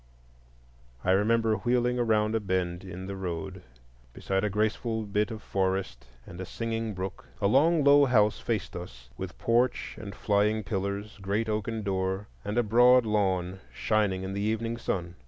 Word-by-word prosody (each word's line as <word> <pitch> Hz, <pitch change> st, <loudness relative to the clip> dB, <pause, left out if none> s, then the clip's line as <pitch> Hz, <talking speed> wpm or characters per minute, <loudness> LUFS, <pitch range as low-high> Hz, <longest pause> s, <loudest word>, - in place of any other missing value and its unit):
I 90 Hz, -, +2 dB
remember 110 Hz, +3 st, +3 dB
wheeling 125 Hz, +2 st, +1 dB
around 110 Hz, -2 st, +2 dB
a 115 Hz, -, +2 dB
bend 90 Hz, -3 st, -2 dB
in 95 Hz, 0 st, -7 dB
the 100 Hz, +1 st, -5 dB
road 95 Hz, 0 st, -5 dB, 0.5 s
beside 95 Hz, 0 st, -1 dB
a 105 Hz, -, +1 dB
graceful 110 Hz, +2 st, -1 dB
bit 105 Hz, +2 st, 0 dB
of 110 Hz, -2 st, -7 dB
forest 95 Hz, -10 st, -2 dB, 0.2 s
and 90 Hz, 0 st, -9 dB
a -, -, -4 dB
singing 115 Hz, -1 st, -3 dB
brook. 95 Hz, +1 st, -6 dB
A 100 Hz, -, -1 dB
long 150 Hz, +8 st, +4 dB
low 140 Hz, 0 st, +7 dB
house 110 Hz, -5 st, +3 dB
faced 110 Hz, -4 st, -3 dB
us, 60 Hz, -9 st, -9 dB
with -, -, -7 dB
porch 120 Hz, +2 st, +1 dB
and 100 Hz, -2 st, -7 dB
flying 105 Hz, +1 st, +1 dB
pillars, 100 Hz, +2 st, -3 dB
great 100 Hz, +4 st, -1 dB
oaken 110 Hz, +1 st, -2 dB
door, 95 Hz, +1 st, -1 dB, 0.2 s
and 105 Hz, +3 st, -3 dB
a 120 Hz, -, +4 dB
broad 120 Hz, +3 st, +5 dB
lawn 95 Hz, -3 st, 0 dB
shining 105 Hz, -4 st, 0 dB
in 95 Hz, +1 st, -4 dB
the 100 Hz, -, -2 dB
evening 110 Hz, +2 st, -1 dB
sun. 90 Hz, -5 st, -3 dB
105 Hz, 165 wpm, -28 LUFS, 95-115 Hz, 0.5 s, low